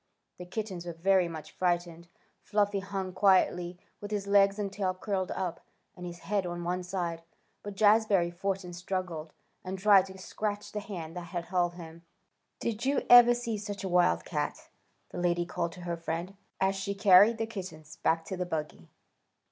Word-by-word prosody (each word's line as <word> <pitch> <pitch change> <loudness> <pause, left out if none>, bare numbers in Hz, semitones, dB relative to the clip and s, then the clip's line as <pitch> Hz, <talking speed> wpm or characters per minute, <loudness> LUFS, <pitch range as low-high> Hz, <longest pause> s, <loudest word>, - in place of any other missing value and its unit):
The 180 - -8
kittens 185 -3 -5
were 170 - -4
very 185 +2 +3
much 160 -2 -8
frightened. 175 -2 -1 0.3
Fluffy 205 -1 +1
hung 195 -1 -4
quietly, 180 -2 +3 0.2
with 205 - -7
his 205 -2 -2
legs 200 0 +4
and 200 -2 -3
tail 190 -2 -1
curled 190 -1 -2
up, 180 -3 -4 0.3
and 180 -1 -7
his 175 0 -9
head 205 -1 0
on 175 -1 -4
one 180 +1 -1
side, 175 -2 -3 0.4
but 205 -1 -7
Jazbury 205 -4 +4
fought 195 +2 -2
and 175 -1 -8
struggled, 180 -3 -4 0.3
and 185 +1 -4
tried 195 -1 +5
to 190 0 -11
scratch 205 +2 -4
the 210 - -3
hand 175 -6 -7
that 175 - -5 0.2
held 175 -1 0
him. 165 -1 -10 0.6
"Did 230 0 -3
you 275 +1 +1
ever 240 0 +9
see 235 -3 -3
such 205 -1 -6
a - - -2
little - - -5
wildcat?" 85 - 0 0.4
the - - -5
lady 175 -1 +1
called 170 -1 -3
to 180 - -11
her 170 -1 -3
friend, 170 +3 -4 0.2
as 190 0 +2
she 195 +1 -3
carried 200 +2 +6
the 225 - -1
kittens 185 -8 -8
back 165 0 +1
to 190 - -4
the 180 0 -2
buggy. 150 - -5
185 Hz, 180 wpm, -30 LUFS, 175-200 Hz, 0.6 s, ever